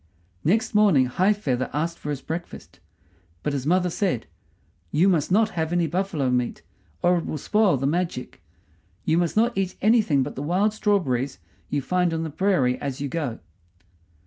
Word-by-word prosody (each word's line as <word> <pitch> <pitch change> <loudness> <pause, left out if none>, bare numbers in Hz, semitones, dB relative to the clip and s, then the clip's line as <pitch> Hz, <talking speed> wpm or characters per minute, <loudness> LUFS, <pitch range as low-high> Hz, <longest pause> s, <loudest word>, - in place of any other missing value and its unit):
Next 220 +8 +1
morning 200 -11 +5
High 185 +11 +2
feather 130 -12 -1
asked 165 +3 -2
for 150 - -6
his 145 -2 -4
breakfast; 170 +2 -7 0.6
but 150 - -1
his 135 0 -3
mother 180 +1 +2
said, 175 - -1 0.7
"You 170 +6 +3
must 170 -4 +2
not 215 +3 +4
have 160 -4 -2
any 175 -1 +2
buffalo 165 -5 -1
meat, 125 -1 -1 0.4
or 175 0 +4
it - - -6
will 155 - -3
spoil 205 +1 +2
the 135 - -2
magic. 165 -3 -2 0.6
You 160 +2 +3
must 175 +3 -1
not 235 +2 +3
eat 190 -1 -1
anything 210 - +3
but - - -5
the - - -6
wild 185 +8 +1
strawberries 140 - 0 0.3
you 145 -2 -1
find 180 +1 +1
on 160 - -2
the 160 - -4
prairie 155 -8 +1
as 140 -3 -4
you 140 0 -3
go." 140 -7 -3
165 Hz, 175 wpm, -24 LUFS, 140-190 Hz, 0.7 s, morning